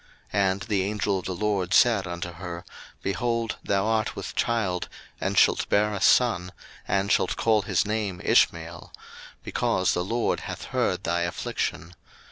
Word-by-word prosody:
01:016:011 100 Hz, -, +3 dB
And 95 Hz, +1 st, -2 dB
the 105 Hz, -5 st, 0 dB
angel 100 Hz, -1 st, 0 dB
of 90 Hz, -, -10 dB
the 95 Hz, -, -3 dB
LORD 100 Hz, -1 st, -1 dB
said 110 Hz, -6 st, +4 dB
unto 85 Hz, 0 st, -5 dB
her, 85 Hz, 0 st, -7 dB, 0.4 s
Behold, 115 Hz, +2 st, -1 dB
thou 100 Hz, 0 st, +1 dB
art 110 Hz, -1 st, 0 dB
with -, -, -6 dB
child 100 Hz, -7 st, 0 dB, 0.3 s
and -, -, -2 dB
shalt -, -, +4 dB
bear 105 Hz, +1 st, +2 dB
a 100 Hz, -, -4 dB
son, 90 Hz, -8 st, +3 dB, 0.4 s
and 100 Hz, +1 st, +1 dB
shalt 95 Hz, -, +2 dB
call 110 Hz, -2 st, +2 dB
his 100 Hz, -, 0 dB
name 105 Hz, -3 st, -2 dB
Ishmael; 85 Hz, +1 st, +1 dB, 0.5 s
because 95 Hz, -, +1 dB
the 90 Hz, -, 0 dB
LORD 115 Hz, +5 st, 0 dB
hath -, -, -6 dB
heard -, -, 0 dB
thy 85 Hz, +1 st, 0 dB
affliction. 85 Hz, 0 st, -3 dB
95 Hz, 160 wpm, -26 LUFS, 90-105 Hz, 0.5 s, said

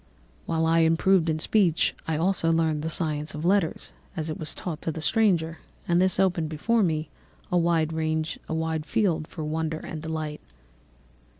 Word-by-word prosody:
"While 165 Hz, -1 st, +1 dB
I 165 Hz, +1 st, +3 dB
improved 165 Hz, +2 st, +3 dB
in 155 Hz, -, +1 dB
speech, 170 Hz, 0 st, +2 dB
I 160 Hz, -1 st, 0 dB
also 170 Hz, -1 st, +1 dB
learned 160 Hz, -2 st, +1 dB
the 160 Hz, -, -2 dB
science 155 Hz, -2 st, -1 dB
of 150 Hz, +2 st, -4 dB
letters 190 Hz, -3 st, +1 dB, 0.2 s
as 160 Hz, 0 st, -2 dB
it 155 Hz, -, -6 dB
was 155 Hz, -, -4 dB
taught 165 Hz, -4 st, -5 dB
to 160 Hz, -, -2 dB
the 160 Hz, -, -6 dB
stranger, 170 Hz, -3 st, +2 dB, 0.3 s
and 175 Hz, 0 st, +3 dB
this 185 Hz, -1 st, +2 dB
opened 175 Hz, -5 st, +2 dB
before 225 Hz, +10 st, +1 dB
me 155 Hz, -5 st, 0 dB, 0.4 s
a 180 Hz, -, +3 dB
wide 165 Hz, -2 st, +2 dB, 0.9 s
field 170 Hz, -5 st, 0 dB
for 155 Hz, -, -7 dB
wonder 160 Hz, +1 st, -2 dB
and 155 Hz, -1 st, -7 dB
delight. 155 Hz, -2 st, -4 dB
160 Hz, 165 wpm, -26 LUFS, 155-175 Hz, 0.9 s, I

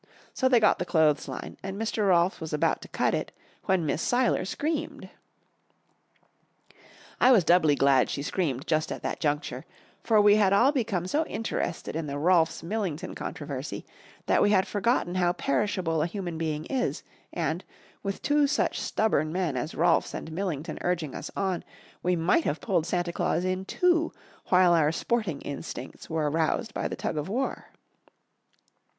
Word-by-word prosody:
So 260 Hz, -, +2 dB
they 245 Hz, -2 st, +5 dB
got 215 Hz, -, +3 dB
the -, -, 0 dB
clothesline, 155 Hz, -4 st, 0 dB
and 195 Hz, +1 st, -5 dB
Mr. 220 Hz, -2 st, 0 dB
Rolfs 175 Hz, 0 st, +3 dB
was 160 Hz, -1 st, -5 dB
about 150 Hz, -, +1 dB
to -, -, -10 dB
cut -, -, 0 dB
it, -, -, -2 dB, 0.3 s
when 185 Hz, -4 st, +1 dB
Miss 150 Hz, -, -1 dB
Seiler 245 Hz, -4 st, +1 dB
screamed. 310 Hz, -, -3 dB, 2.1 s
I 255 Hz, -, +6 dB
was 220 Hz, -8 st, +6 dB
doubly 155 Hz, -2 st, +4 dB
glad 135 Hz, -2 st, +3 dB
she 140 Hz, -, -3 dB
screamed 145 Hz, -5 st, -2 dB
just 155 Hz, -1 st, 0 dB
at -, -, -5 dB
that -, -, -3 dB
juncture, 145 Hz, -3 st, -2 dB, 0.4 s
for 220 Hz, -2 st, +3 dB
we 205 Hz, 0 st, +6 dB
had 200 Hz, -2 st, +4 dB
all 245 Hz, +8 st, +5 dB
become 220 Hz, -, -1 dB
so 295 Hz, -, +1 dB
interested 195 Hz, -8 st, -3 dB
in 160 Hz, -1 st, -3 dB
the 140 Hz, 0 st, -4 dB
Rolfs 165 Hz, +1 st, +2 dB
Millington 180 Hz, -4 st, -3 dB
controversy -, -, -6 dB, 0.4 s
that -, -, +3 dB
we 205 Hz, -, +4 dB
had 190 Hz, -2 st, +4 dB
forgotten 210 Hz, -3 st, 0 dB
how 175 Hz, -1 st, +2 dB
perishable 165 Hz, 0 st, 0 dB
a 160 Hz, -, +1 dB
human 175 Hz, -3 st, -5 dB
being 155 Hz, -1 st, -2 dB
is, 260 Hz, +3 st, -2 dB, 0.3 s
and, -, -, -2 dB, 0.4 s
with 195 Hz, -1 st, -4 dB
two 290 Hz, 0 st, +3 dB
such -, -, 0 dB
stubborn 155 Hz, -8 st, +1 dB
men 175 Hz, -5 st, -1 dB
as 130 Hz, +6 st, -3 dB
Rolfs 170 Hz, 0 st, +2 dB
and 160 Hz, -, -6 dB
Millington 165 Hz, -3 st, -3 dB
urging 170 Hz, -6 st, -1 dB
us -, -, -6 dB
on, 190 Hz, -3 st, -1 dB, 0.4 s
we 180 Hz, 0 st, +1 dB
might 175 Hz, -, +2 dB
have 150 Hz, -, -1 dB
pulled 165 Hz, +2 st, 0 dB
Santa 175 Hz, -1 st, -1 dB
Claus 170 Hz, +1 st, 0 dB
in 185 Hz, +1 st, -1 dB
two 335 Hz, -, +2 dB, 0.4 s
while 180 Hz, -1 st, +5 dB
our 155 Hz, -3 st, +3 dB
sporting 190 Hz, -3 st, -1 dB
instincts 135 Hz, -2 st, -7 dB
were 160 Hz, -2 st, 0 dB
aroused 165 Hz, +9 st, 0 dB
by -, -, -2 dB
the -, -, -5 dB
tug -, -, -3 dB
of 150 Hz, +4 st, -3 dB
war. 255 Hz, +6 st, -2 dB
180 Hz, 170 wpm, -27 LUFS, 155-210 Hz, 2.1 s, I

